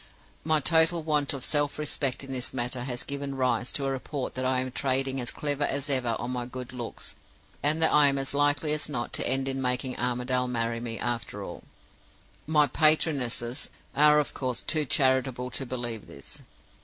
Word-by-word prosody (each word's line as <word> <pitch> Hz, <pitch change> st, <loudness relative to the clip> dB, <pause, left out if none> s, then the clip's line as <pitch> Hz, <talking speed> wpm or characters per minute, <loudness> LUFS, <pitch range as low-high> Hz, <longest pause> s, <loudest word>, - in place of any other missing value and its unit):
My 155 Hz, 0 st, +3 dB
total 165 Hz, +2 st, +4 dB
want 150 Hz, -2 st, +1 dB
of 135 Hz, -3 st, -4 dB
self 145 Hz, -1 st, +1 dB
respect 140 Hz, -3 st, -2 dB
in 135 Hz, -, -8 dB
this 130 Hz, 0 st, -4 dB
matter 125 Hz, 0 st, -1 dB
has 125 Hz, -2 st, -4 dB
given 140 Hz, -1 st, -4 dB
rise 125 Hz, -2 st, 0 dB
to 140 Hz, -, -1 dB
a 135 Hz, -, 0 dB
report 135 Hz, +1 st, -4 dB
that 130 Hz, 0 st, -2 dB
I 130 Hz, 0 st, +2 dB
am 130 Hz, 0 st, -2 dB
trading 135 Hz, 0 st, 0 dB
as 120 Hz, -, -2 dB
cleverly 145 Hz, -1 st, -1 dB
as 140 Hz, +1 st, -1 dB
ever 125 Hz, -4 st, +1 dB
on 120 Hz, -, -4 dB
my 125 Hz, -1 st, -2 dB
good 125 Hz, 0 st, -7 dB
looks, 120 Hz, -2 st, -6 dB, 0.5 s
and 150 Hz, +2 st, +2 dB
that -, -, +4 dB
I 150 Hz, -1 st, +7 dB
am 140 Hz, 0 st, +2 dB
as 135 Hz, 0 st, -2 dB
likely 145 Hz, +1 st, +2 dB
as 150 Hz, -1 st, -2 dB
not 120 Hz, -5 st, -3 dB
to -, -, 0 dB
end 135 Hz, +1 st, +1 dB
in 135 Hz, 0 st, -1 dB
making 125 Hz, 0 st, 0 dB
Armadale 125 Hz, +1 st, 0 dB
marry 115 Hz, -1 st, -1 dB
me, 115 Hz, -1 st, -5 dB
after 120 Hz, -1 st, -3 dB
all. -, -, -9 dB, 0.8 s
My 150 Hz, -1 st, +4 dB
'patronesses' 145 Hz, -5 st, +1 dB, 0.3 s
are, 150 Hz, +1 st, +6 dB
of 150 Hz, -, 0 dB
course, 125 Hz, -3 st, -2 dB
too 155 Hz, -2 st, +2 dB
charitable 130 Hz, -2 st, +2 dB
to 135 Hz, -, -3 dB
believe 120 Hz, -3 st, -4 dB
this. -, -, -10 dB
130 Hz, 190 wpm, -27 LUFS, 125-145 Hz, 0.8 s, I